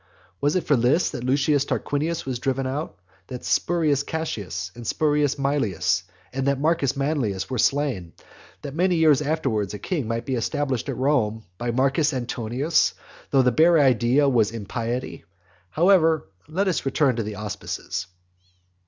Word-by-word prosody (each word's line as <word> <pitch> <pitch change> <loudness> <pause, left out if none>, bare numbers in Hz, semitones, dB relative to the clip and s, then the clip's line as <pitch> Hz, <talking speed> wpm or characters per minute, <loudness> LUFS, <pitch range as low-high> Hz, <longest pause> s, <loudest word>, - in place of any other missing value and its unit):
Was 145 +3 +2
it 180 - +1
for 145 - +3
this 125 +8 +2
that 120 - -6
Lucius 140 +2 +2
Tarquinius 155 +3 -2
was 130 -3 -3
driven 135 +1 -1
out; 140 - -4 0.3
that 125 -1 -7
Spurius 155 -5 +1
Cassius, 100 - -4
and 120 -2 -9
Spurius 150 -2 +1
Maelius, 140 -9 0 0.3
and 135 +1 -1
Marcus 150 -3 +1
Manlius 135 -8 -1
were 125 - -1
slain; 130 - 0 0.5
that 140 - -6
many 180 +3 +2
years 155 -3 +4
afterwards 135 - -1
a - - -4
king 145 - -3
might 115 0 -2
be 135 - -2
established 130 +1 -1
at - - -3
Rome 115 -6 +1 0.2
by 120 - -2
Marcus 135 +5 +2
Antonius, 125 +5 0 0.3
though 135 -2 +4
the 125 - +3
bare 165 +7 +5
idea 130 0 +4
was 115 -6 +3
impiety? 115 +3 -4 0.5
However, 165 - +3 0.2
let 185 +6 -1
us 185 - 0
return 135 -1 +2
to - - 0
the 105 0 -5
auspices. 100 -2 -5
135 Hz, 155 wpm, -24 LUFS, 120-150 Hz, 0.5 s, bare